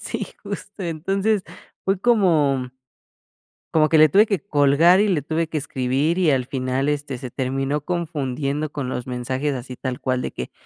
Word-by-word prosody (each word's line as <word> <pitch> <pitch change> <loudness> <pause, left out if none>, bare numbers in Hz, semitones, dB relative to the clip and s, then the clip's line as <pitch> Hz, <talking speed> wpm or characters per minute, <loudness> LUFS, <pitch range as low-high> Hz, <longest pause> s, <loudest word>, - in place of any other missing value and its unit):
Sí, - - -4 0.2
justo. 200 0 -7
Entonces 195 +5 0 0.4
fue 195 -1 0
como, 175 - +3
mm 125 -1 -6 1.0
como 155 -1 +4
que 160 - +4
le 155 0 +8
tuve 205 +8 +5
que 200 -6 0
colgar 155 +2 +4
y 210 - +3
le 160 -8 +1
tuve 160 +1 -1
que 155 - -3
escribir, 140 +4 0
y 170 -4 +3
al 130 -3 +2
final, 130 +1 -1
este, 145 -3 -2
se 125 -2 -7
terminó 135 +2 -1
confundiendo 150 -3 -2
con 140 -4 -4
los 125 -1 -4
mensajes. 130 +3 -2
Así 125 0 -7
tal 130 0 -4
cual 130 -1 -1
de - - -3
que: 65 - -6
145 Hz, 180 wpm, -22 LUFS, 130-170 Hz, 1.0 s, le